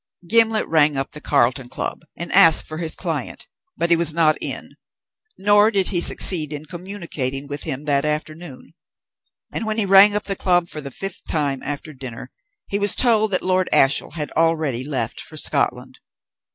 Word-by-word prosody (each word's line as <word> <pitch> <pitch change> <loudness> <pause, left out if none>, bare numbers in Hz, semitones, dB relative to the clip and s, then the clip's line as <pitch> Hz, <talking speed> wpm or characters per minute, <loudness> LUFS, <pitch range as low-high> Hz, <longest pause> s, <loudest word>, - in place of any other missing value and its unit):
Gimblet 225 +1 +3
rang 150 -3 +2
up 135 - -4
the 150 - -9
Carlton 125 -3 0
Club 135 - -5 0.2
and 170 - -6
asked 165 -5 +6
for 155 0 -7
his 165 -2 -4
client, - - -5 0.3
but 170 0 0
he - - +6
was 165 -2 +1
not 155 -2 +3
in, - - -5 0.7
nor 205 +2 +4
did 195 -4 +1
he 175 -4 0
succeed 160 -5 +4
in 150 0 -7
communicating 165 -7 -5
with 145 0 -6
him 135 +3 -4
that 140 -2 +1
afternoon; 155 0 -6 0.8
and - - -4
when 215 0 -2
he 220 - +1
rang 195 +2 +6
up 210 - -2
the 195 - -4
Club 175 -2 0
for 155 - -6
the 140 - -6
fifth 195 +8 -6
time 145 -4 -2
after 145 +2 -6
dinner 130 -2 -9 0.4
he 200 - -2
was 205 -1 +3
told 220 -3 +3
that 185 - -1
Lord 185 0 0
Ashiel 135 +1 +2
had 150 -3 -5
already 160 -6 0
left 130 -5 -3
for 155 - -11
Scotland. 130 -3 -2
160 Hz, 180 wpm, -20 LUFS, 140-190 Hz, 0.8 s, asked